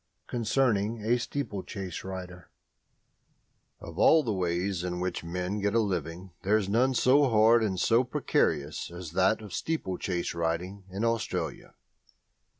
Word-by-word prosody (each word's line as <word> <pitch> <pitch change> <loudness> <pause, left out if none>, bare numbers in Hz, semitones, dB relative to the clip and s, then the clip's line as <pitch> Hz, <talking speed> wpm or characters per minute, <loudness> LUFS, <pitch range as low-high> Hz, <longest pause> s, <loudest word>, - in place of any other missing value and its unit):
CONCERNING 115 -3 0
A 120 +2 +3
STEEPLECHASE 100 -8 -5
RIDER 90 -3 -8 1.3
Of 85 +1 -9
all 160 -1 +6
the 110 - -1
ways 90 0 -1
in 90 -1 -3
which 90 -2 -3
men 90 +4 -3
get 105 +2 0
a - - +5
living 90 -3 -3
there 100 +3 +3
is 105 -3 -2
none 125 +6 +2
so 135 +3 +4
hard 115 +1 +5
and 95 -4 -1
so 115 +5 +4
precarious 75 - 0
as 85 -2 -8
that 95 +5 +2
of 100 -4 -9
steeplechase 95 - -2
riding 85 +4 -3
in 100 +5 -2
Australia. 115 -1 -2
100 Hz, 140 wpm, -28 LUFS, 90-115 Hz, 1.3 s, all